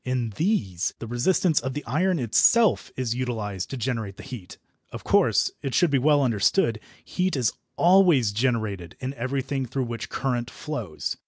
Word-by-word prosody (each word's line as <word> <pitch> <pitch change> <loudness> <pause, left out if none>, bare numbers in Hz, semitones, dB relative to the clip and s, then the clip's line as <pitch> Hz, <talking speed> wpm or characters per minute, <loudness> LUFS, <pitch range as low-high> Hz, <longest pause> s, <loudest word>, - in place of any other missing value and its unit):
In 125 -3 -2
these 105 - -1
the - - -7
resistance 145 +8 +1
of 130 +2 -5
the 150 - -5
iron 175 +9 +1
itself 185 - +3
is 125 -3 -1
utilised 110 -7 -3
to 135 - -5
generate 115 -5 -3
the - - -10
heat. 120 -9 -9 0.3
Of - - -8
course, - - +3
it 135 - -3
should 175 -4 +3
be 140 - +3
well 145 +1 +3
understood, 115 - +2 0.3
heat 185 -1 -1
is 125 -5 +1 0.2
always 175 - +5
generated 105 -6 -2
in 130 +1 -4
everything 135 +1 -3
through 130 +3 -2
which 115 -1 -6
current 125 -2 -2
flows. 120 - -5
125 Hz, 165 wpm, -25 LUFS, 115-145 Hz, 0.3 s, always